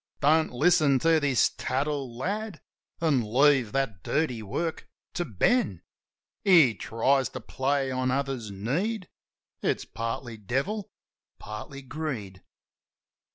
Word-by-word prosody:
Don't 155 +2 +3
listen 145 +1 +4
to 165 +3 +3
this 140 -5 +3
tattle, 135 -3 -2
lad, 200 - -3 0.4
An' 150 -6 +3
leave 130 +1 +3
that 135 -10 -1
dirty 135 - -1
work 160 - -3 0.2
to 175 - -1
Ben. 130 - +1 0.6
He 165 - +6
tries 130 +5 +1
to 130 - -7
play 135 +2 -1
on 130 0 0
others 135 -4 -2
need; 170 - -2 0.5
It's - - 0
partly 115 0 -5
devil, 135 - -2 0.5
partly 110 +6 -8
greed. 130 - -5
135 Hz, 110 wpm, -27 LUFS, 115-160 Hz, 0.6 s, He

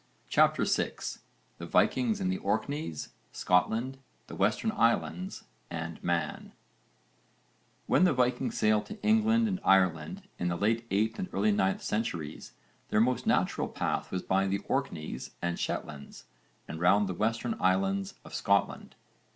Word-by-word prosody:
CHAPTER - - +3
VI - - +1 0.7
THE - - -6
VIKINGS 225 -4 +2
IN 190 -1 0
THE 190 +1 -1
ORKNEYS, 140 - -2 0.2
SCOTLAND, 110 +9 +1 0.3
THE - - -9
WESTERN 110 - +1
ISLANDS 180 - 0 0.3
AND - - -6
MAN - - -2 1.3
When - - +3
the 180 - +4
Vikings 125 -1 0
sailed 110 -1 +2
to 215 0 -8
England 225 +1 +4
and 190 -3 -2
Ireland 90 -5 +2 0.2
in 90 - -1
the 85 - 0
late 115 +5 0
8th 110 +3 0
and 90 - -3
early 105 +2 +2
9th 95 -1 +1
centuries 85 -9 -3 0.4
their 105 - +2
most 125 +2 +1
natural - - +1
path - - -2
was 90 - -2
by 95 +1 +1
the 100 +1 -1
Orkneys 75 -4 -3
and 85 0 -2
Shetlands 75 -2 -5 0.4
and 80 - -6
round 100 +4 +4
the 95 - -2
Western 115 +4 -1
Islands 95 +1 +1
of - - -12
Scotland. - - 0
105 Hz, 145 wpm, -30 LUFS, 95-130 Hz, 1.3 s, the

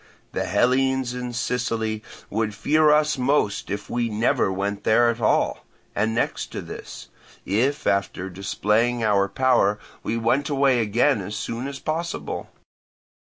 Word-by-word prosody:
The - - -2
Hellenes 130 +4 +2
in 125 0 -4
Sicily 115 -3 -1 0.3
would 110 0 -1
fear 155 +4 +3
us 150 -1 +3
most 125 -6 +1
if 100 +1 -4
we 120 -1 -1
never 110 -2 +1
went 100 +1 -3
there 120 +2 +4
at 115 0 -7
all, 105 - +1 0.3
and 110 +2 0
next - - -1
to - - -4
this, - - -9 0.4
if 125 +9 0
after 100 -1 0
displaying 105 +5 0
our 100 -2 +3
power 110 -3 +3 0.2
we 115 - -2
went 130 +6 +1
away 135 -3 +3
again 115 +3 +2
as 100 +3 -5
soon 120 +3 -4
as 140 -1 -6
possible. 165 +4 -4
115 Hz, 145 wpm, -24 LUFS, 105-130 Hz, 0.4 s, there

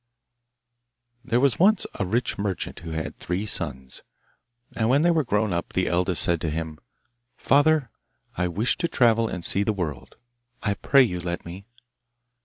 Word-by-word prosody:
There 120 -1 +1
was 135 -1 +2
once 200 +3 +4
a 100 - -3
rich 115 +6 0
merchant 100 -3 -3
who 85 - -8
had 80 0 -5
three 90 +4 -3
sons, 65 -10 -3 0.7
and 110 0 +1
when 140 +4 +4
they 175 - +4
were 160 -2 +2
grown 105 -5 0
up 85 - -3
the 95 - +1
eldest 90 0 +1
said 85 -2 +1
to 80 - -1
him, 80 0 -4 0.6
'Father, 145 -1 +3 0.4
I 90 0 0
wish 105 +8 0
to 170 - +1
travel 115 -6 +3
and 90 -2 -4
see 100 - +2
the 105 +1 +1
world. 85 -8 -5 0.5
I 105 - +1
pray 135 +6 +4
you 90 -7 -2
let 85 0 -4
me. 90 +4 -9
100 Hz, 170 wpm, -25 LUFS, 85-125 Hz, 0.7 s, once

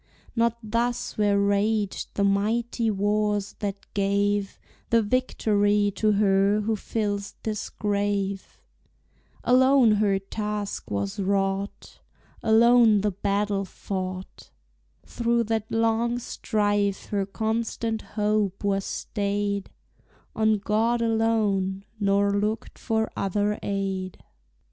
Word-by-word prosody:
Not 235 0 +2
thus 235 +3 -1
were 205 -1 +2
raged 200 0 0
the 200 - +1
mighty 225 +4 +1
wars 205 0 0
that 200 -1 -4
gave 200 0 0 0.3
The 230 -1 +4
victory 205 -3 +1
to 215 -1 +3
her 200 0 +3
who 220 +1 0
fills 205 -1 -3
this 215 -1 -3
grave; 200 -2 -2 0.8
Alone 260 -1 +5
her 200 -2 +2
task 210 +1 -4
was 100 - -3
wrought, 195 0 -2 0.4
Alone 225 -1 +5
the 210 0 +1
battle 200 +1 -1
fought; 185 -1 -6 0.6
Through 235 0 0
that 220 -1 -2
long 230 +1 +1
strife 205 -4 -1
her 200 -2 -1
constant 225 +1 -2 0.2
hope 210 -2 0
was 195 -1 +1
staid 200 -1 -2 0.7
On 220 -1 +3
God 225 +4 +1
alone, 210 -4 +1
nor 200 0 +2
looked 210 +2 -2
for 220 -1 0
other 205 +2 0
aid. 195 -2 -3
205 Hz, 105 wpm, -25 LUFS, 200-220 Hz, 0.8 s, Alone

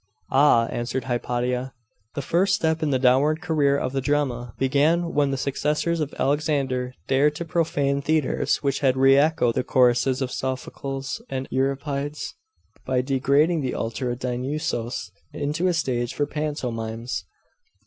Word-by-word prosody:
'Ah!' 135 -4 +5
answered 120 +2 -2
Hypatia; 125 +1 -2 0.4
'the 140 - -2
first 190 +7 +2
step 160 -2 0
in 155 - +1
the 135 - +2
downward 135 +5 +3
career 150 -6 +2
of 130 - -2
the 135 - 0
drama 130 -5 -1
began 150 +6 +2
when 145 -1 +2
the 135 - -1
successors 150 +5 0
of 150 -2 -2
Alexander 135 -3 0
dared 145 +3 +3
to 170 - -4
profane 145 -5 0
theatres 155 0 0
which 140 -1 0
had 130 -2 +2
re 135 +1 +6
echoed 140 -4 +3
the - - 0
choruses 125 +1 +3
of 125 - -4
Sophocles 135 - -4
and 130 0 -3
Euripides 140 +2 -2 0.5
by 130 -1 +1
degrading 140 +5 +2
the 130 -2 -2
altar 115 +2 -3
of 120 - -2
Dionusos 125 -1 -3 0.2
into 150 +5 -1
a - - +3
stage 120 -6 -1
for 145 - +1
pantomimes! 125 -6 -3
135 Hz, 150 wpm, -24 LUFS, 125-150 Hz, 0.5 s, re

